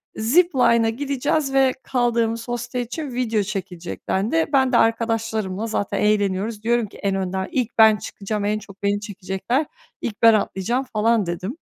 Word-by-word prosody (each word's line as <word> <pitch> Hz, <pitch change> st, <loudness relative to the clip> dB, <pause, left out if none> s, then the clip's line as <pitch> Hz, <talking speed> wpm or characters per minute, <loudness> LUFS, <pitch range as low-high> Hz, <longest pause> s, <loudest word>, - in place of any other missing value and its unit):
zip-line’a 235 Hz, -3 st, +3 dB
gideceğiz 275 Hz, +3 st, -1 dB
ve 265 Hz, -1 st, +4 dB
kaldığımız 235 Hz, -2 st, 0 dB
hostel 245 Hz, +1 st, -3 dB
için 255 Hz, +3 st, -5 dB
video 230 Hz, -4 st, 0 dB
çekilecek 185 Hz, -4 st, -6 dB
dendi. 230 Hz, +13 st, +1 dB
Ben 265 Hz, -1 st, +4 dB
de 235 Hz, -, +4 dB
arkadaşlarımla 225 Hz, -2 st, 0 dB
zaten 205 Hz, -2 st, -2 dB
eğleniyoruz. 210 Hz, +1 st, 0 dB
Diyorum 235 Hz, -1 st, +1 dB
ki, -, -, -15 dB
"En 195 Hz, -1 st, -1 dB
önden 190 Hz, 0 st, -2 dB
ilk 245 Hz, -3 st, 0 dB
ben 220 Hz, -1 st, +7 dB
çıkacağım, 205 Hz, 0 st, -4 dB
en 210 Hz, +1 st, 0 dB
çok 200 Hz, -1 st, -15 dB
beni 200 Hz, 0 st, +1 dB
çekecekler, 205 Hz, -, -2 dB, 0.4 s
ilk 210 Hz, 0 st, -5 dB
ben 230 Hz, -1 st, +8 dB
atlayacağım." 215 Hz, +5 st, 0 dB
falan 220 Hz, 0 st, +2 dB
dedim. 185 Hz, -, -4 dB
225 Hz, 155 wpm, -22 LUFS, 205-245 Hz, 0.4 s, ben